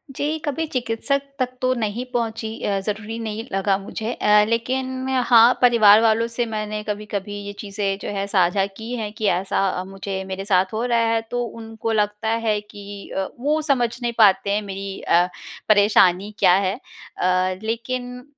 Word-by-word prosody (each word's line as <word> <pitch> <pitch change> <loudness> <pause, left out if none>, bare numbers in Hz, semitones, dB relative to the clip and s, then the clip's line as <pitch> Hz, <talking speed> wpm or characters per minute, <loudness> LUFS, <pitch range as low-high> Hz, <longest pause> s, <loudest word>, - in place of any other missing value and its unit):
जी, 300 +3 -1
कभी 295 +2 -1
चिकित्सक 255 +1 -1 0.2
तक 255 -1 +1
तो 255 0 +2
नहीं 230 0 -3
पहुँची 230 -2 -2
अ, 200 -1 0
ज़रूरी 215 +1 -4
नहीं 220 -1 -4
लगा 195 0 +1
मुझे। 215 +4 -5
अ, 210 0 +4
लेकिन 260 +3 -2 0.2
हाँ, 235 +1 +7
परिवार 225 -4 +7
वालों 230 0 +3
से 235 +1 -2
मैंने 215 -1 -4
कभी-कभी 205 -1 -4
ये 205 - -6
चीज़ें 200 -1 -2
जो - - -5
है 195 0 -1
साझा 195 0 +2
की 225 +2 -7
हैं 215 -3 -4
कि 220 -1 -4
ऐसा 190 0 0
अ, 180 0 -3
मुझे 195 0 -5
मेरे 190 +1 -5
साथ 190 -1 +2
हो 220 +2 -1
रहा 240 -1 +2
है, 225 - +1
तो 245 0 -1
उनको 225 -1 -6
लगता 210 0 0 0.2
है 210 -1 +2
कि 205 -1 -11
अ, 190 -1 -1
वो 300 +5 +1
समझ 270 -6 +2
नहीं 240 -1 -1
पाते 200 -2 +4
हैं 205 +1 +1
मेरी 195 -1 -6
अ, 175 +1 +3 0.4
परेशानी 205 -1 +4
क्या 180 - +6
है। 190 - -1 0.4
अ, 185 0 +1
लेकिन 245 +2 -4
215 Hz, 175 wpm, -22 LUFS, 200-235 Hz, 0.4 s, हाँ